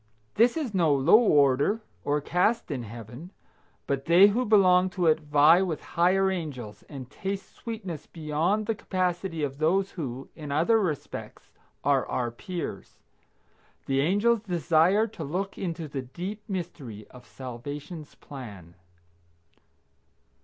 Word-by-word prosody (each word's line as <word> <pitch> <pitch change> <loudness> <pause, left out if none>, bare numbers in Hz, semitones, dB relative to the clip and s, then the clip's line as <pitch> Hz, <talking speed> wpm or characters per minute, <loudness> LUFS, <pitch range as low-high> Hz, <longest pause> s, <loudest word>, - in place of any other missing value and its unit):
This 235 +6 +3
is 275 -9 -3
no 170 -5 +3
low 145 +10 +6
order 145 - +3 0.2
or 145 +1 0
caste 180 +6 +1
in 135 -4 -2
Heaven, 120 - -9 0.6
but 135 -1 -2
they 180 +5 +7
who 245 +5 0
belong 185 -4 +5
to 180 -1 -2
it 160 -1 +4
vie 150 +3 +5
with 175 -6 -2
higher 190 +3 +3
angels, 140 - -6
and 135 -4 -8
taste 195 +7 -5
sweetness 195 -9 -7
beyond 165 +6 -1
the 225 - 0
capacity 180 -5 -2
of 140 0 -3
those 190 +5 +2
who, 135 -6 -6
in 150 -3 -7
other 170 +10 +3
respects, 165 -9 -5 0.3
are - - +2
our 120 -2 -2
peers. 175 +8 -6 0.9
The 135 0 0
angels 205 +8 +2
desire 180 +1 +3
to 205 -7 -8
look 185 +7 -3
into 165 -3 -4
the 140 -2 -4
deep 180 - -6
mystery 145 - -6
of 125 -1 -15
salvation's 145 +5 -8
plan. 105 - -10
165 Hz, 135 wpm, -27 LUFS, 140-195 Hz, 0.9 s, they